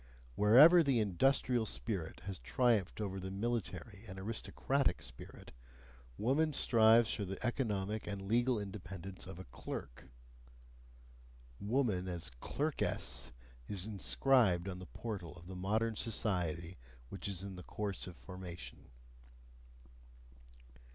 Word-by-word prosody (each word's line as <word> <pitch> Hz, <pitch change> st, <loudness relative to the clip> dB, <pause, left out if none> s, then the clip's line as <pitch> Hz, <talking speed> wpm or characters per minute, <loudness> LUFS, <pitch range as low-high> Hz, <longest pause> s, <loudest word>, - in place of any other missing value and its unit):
Wherever 135 Hz, -, +8 dB
the 135 Hz, -6 st, +3 dB
industrial 115 Hz, +3 st, +2 dB
spirit 95 Hz, -9 st, -3 dB
has 95 Hz, +1 st, -5 dB
triumphed 115 Hz, -8 st, +1 dB
over 95 Hz, -2 st, -3 dB
the 95 Hz, 0 st, -5 dB
military 110 Hz, 0 st, -3 dB
and 95 Hz, -1 st, -8 dB
aristocratic 115 Hz, +3 st, 0 dB
spirit, -, -, -11 dB, 0.7 s
woman 150 Hz, +7 st, +2 dB
strives 115 Hz, -3 st, +5 dB
for 105 Hz, -, -2 dB
the 95 Hz, 0 st, -4 dB
economic 110 Hz, -4 st, -1 dB
and 100 Hz, -1 st, -4 dB
legal 120 Hz, +3 st, +3 dB
independence 95 Hz, -2 st, -7 dB
of 95 Hz, -, -8 dB
a 95 Hz, -, -7 dB
clerk: -, -, -7 dB, 1.5 s
"woman 105 Hz, -5 st, 0 dB
as 85 Hz, -6 st, -4 dB
clerkess" 120 Hz, -, -1 dB, 0.4 s
is 95 Hz, -2 st, -2 dB
inscribed 105 Hz, -3 st, +3 dB
on 90 Hz, -2 st, -5 dB
the 95 Hz, -, -9 dB
portal 100 Hz, -8 st, -6 dB
of 85 Hz, -, -13 dB
the 95 Hz, +1 st, -8 dB
modern 110 Hz, +5 st, 0 dB
society 90 Hz, -, -1 dB, 0.3 s
which -, -, -5 dB
is 95 Hz, -2 st, -3 dB
in 100 Hz, -1 st, -6 dB
course 100 Hz, +1 st, -4 dB
of 90 Hz, -, -9 dB
formation. 90 Hz, -2 st, -9 dB
100 Hz, 115 wpm, -35 LUFS, 90-115 Hz, 1.5 s, Wherever